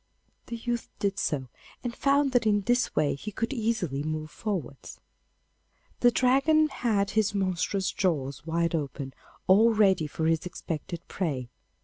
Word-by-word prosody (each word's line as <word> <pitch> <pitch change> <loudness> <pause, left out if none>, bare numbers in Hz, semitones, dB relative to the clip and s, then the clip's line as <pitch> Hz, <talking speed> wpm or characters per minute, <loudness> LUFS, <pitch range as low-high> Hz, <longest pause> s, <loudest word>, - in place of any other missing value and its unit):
The 235 - -4
youth 235 0 -3
did 200 -1 -1
so, 135 -4 -1 0.4
and 240 -1 -3
found 280 0 +2
that 245 -3 +2
in 205 -1 +3
this 245 +5 +1
way 150 - +2
he 205 +10 -6
could 230 +6 -2
easily 215 - -1
move 155 0 -4
forwards. 185 - -5 1.0
The 245 - +6
Dragon 275 +6 +3
had 205 -7 0
his 215 -1 +1
monstrous 190 0 0
jaws 145 -8 -1
wide 165 +1 0
open, 140 -3 -3 0.3
all 215 +5 +6
ready 190 -7 +4
for 160 +2 -3
his 165 +1 +1
expected 170 0 -6
prey. 140 -10 -3
195 Hz, 145 wpm, -28 LUFS, 155-230 Hz, 1.0 s, The